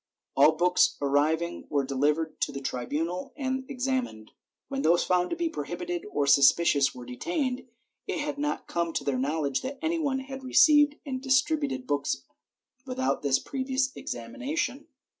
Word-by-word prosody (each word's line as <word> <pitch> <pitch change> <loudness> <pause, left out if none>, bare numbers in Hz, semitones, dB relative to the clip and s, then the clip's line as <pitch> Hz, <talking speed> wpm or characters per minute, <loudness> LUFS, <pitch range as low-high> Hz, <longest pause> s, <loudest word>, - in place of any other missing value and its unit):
All 145 +3 +6
books 180 +3 +3
arriving 155 +4 0
were 140 -2 +1
delivered 150 +4 0
to - - +1
the 140 - -5
tribunal 150 +7 -3
and 265 -1 -3
examined, 255 - -3 0.4
when 275 0 -3
those 170 -5 +3
found 180 -1 +1
to - - -2
be 340 0 -1
prohibited 175 - -4
or 145 -7 0
suspicious 140 0 +4
were 125 -1 -9
detained; 255 - -3 0.4
it - - -2
had 295 -2 -3
not 295 0 -2
come 170 -1 -2
to - - -2
their 135 -3 -1
knowledge 140 0 -1
that 270 +2 -5
any 330 +1 -1
one 275 -4 0
had 265 0 -8
received 295 +2 +5
and 260 -2 -4
distributed 270 0 +1
books 140 - -1 0.6
without 260 0 -1
this 140 -2 +3
previous 260 - -2
examination. 275 - -4
185 Hz, 155 wpm, -28 LUFS, -, 0.6 s, All